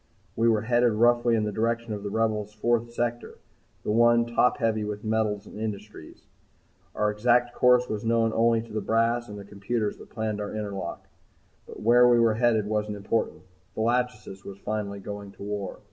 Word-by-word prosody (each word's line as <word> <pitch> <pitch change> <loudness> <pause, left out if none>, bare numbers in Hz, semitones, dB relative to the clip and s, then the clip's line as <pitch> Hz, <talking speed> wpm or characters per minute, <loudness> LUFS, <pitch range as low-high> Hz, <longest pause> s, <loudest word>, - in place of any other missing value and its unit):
We 115 +1 +2
were 110 -2 +2
headed 120 0 +2
roughly 120 +1 +3
in 110 - +1
the 105 - -2
direction 115 +1 -1
of 105 - -5
the 100 - -4
Rebel's 105 -1 -1
fourth 120 +1 0
sector, 120 0 -3 0.5
the - - -1
one 120 +1 +4
top 120 +1 +2
heavy 110 -2 0
with 105 0 -5
metals 110 -2 -1
industries. 105 -6 -8 0.7
Our 105 0 +1
exact 120 +3 +2
course 125 0 +4
was 105 -1 -4
known 115 -1 +1
only 115 0 +2
to 115 -2 -13
the 110 - -1
brass 115 +2 +1
and 105 - -8
the 100 - -9
computers 105 +2 -3
that - - -14
planned 110 -2 -3
our 105 +1 -5
interlock. 100 -4 -5 0.6
But - - -10
where 120 +2 +6
we 120 - +5
were 115 -1 +4
headed 110 -2 +2
wasn't 105 0 -2
important. 100 -4 -2 0.3
The - - -2
"Lachesis" 115 -4 -1
was 100 -1 -9
finally 100 -1 -4
going 100 0 -8
to - - -11
war! 100 -2 -5
110 Hz, 185 wpm, -26 LUFS, 105-120 Hz, 0.7 s, where